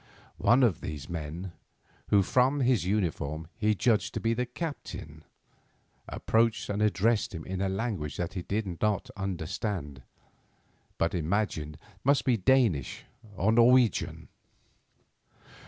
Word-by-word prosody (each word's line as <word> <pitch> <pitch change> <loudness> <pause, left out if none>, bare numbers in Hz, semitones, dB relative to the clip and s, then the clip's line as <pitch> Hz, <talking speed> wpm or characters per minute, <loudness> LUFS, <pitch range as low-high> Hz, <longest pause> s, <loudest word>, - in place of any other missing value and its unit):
One 125 +3 +4
of 110 -9 +2
these 75 -3 -6
men, 85 +2 -5 0.6
who 100 -1 +4
from 130 +7 +2
his 125 -7 +2
uniform 80 -6 -1
he 110 -1 +1
judged 110 +1 +1
to - - 0
be 115 0 +1
the 125 +1 -2
captain, 120 - -7 0.9
approached 115 0 +1
and 100 +1 -2
addressed 105 0 +1
him 80 - -6
in 95 0 -4
a 95 - +1
language 95 -7 -3
that 90 +1 -3
he 90 - -3
did 95 -2 -3
not 105 -2 0
understand, 90 - -4 1.0
but 85 - 0
imagined 80 -3 -1 0.3
must 140 +1 +3
be 125 - +3
Danish 110 - +1 0.3
or 100 +5 +2
Norwegian. 120 -1 +3
100 Hz, 125 wpm, -29 LUFS, 85-115 Hz, 1.0 s, One